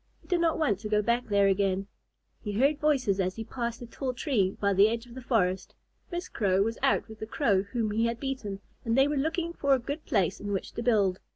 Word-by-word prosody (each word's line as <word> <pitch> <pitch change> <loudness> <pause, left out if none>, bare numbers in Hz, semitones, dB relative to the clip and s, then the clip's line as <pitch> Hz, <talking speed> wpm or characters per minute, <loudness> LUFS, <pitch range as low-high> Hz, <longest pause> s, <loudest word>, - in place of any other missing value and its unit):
He - - -24
did 355 -2 +1
not 330 -1 +2
want 240 - +1
to 215 0 -6
go 210 0 +2
back 235 +3 0
there 200 -1 +3
again. 195 0 +1 0.6
He 210 - -3
heard 280 +7 +2
voices 265 -10 +2
as 185 -1 0
he 225 - -5
passed 235 0 -4
a - - -6
tall 255 +2 -4
tree 220 -9 0
by 200 -1 +2
the 200 +3 +6
edge 230 +1 -3
of 240 - -14
the 260 - -8
forest. 190 -7 0 0.4
Miss 350 +1 -3
Crow 195 -2 +1
was 225 +2 -3
out 270 0 +2
with 220 -1 -11
the 220 - -5
Crow 220 -7 +2
whom 215 +2 -2
he 225 +2 +1
had 230 0 -3
beaten, 240 -8 -4 0.2
and 230 +1 0
they 270 +1 +5
were 295 - -1
looking 325 +4 -1
for 280 -4 +3
a - - +1
good 285 +5 -5
place 200 - +1
in 205 0 -4
which 195 - -3
to - - -5
build. 205 -6 +2
230 Hz, 250 wpm, -28 LUFS, 200-270 Hz, 0.6 s, the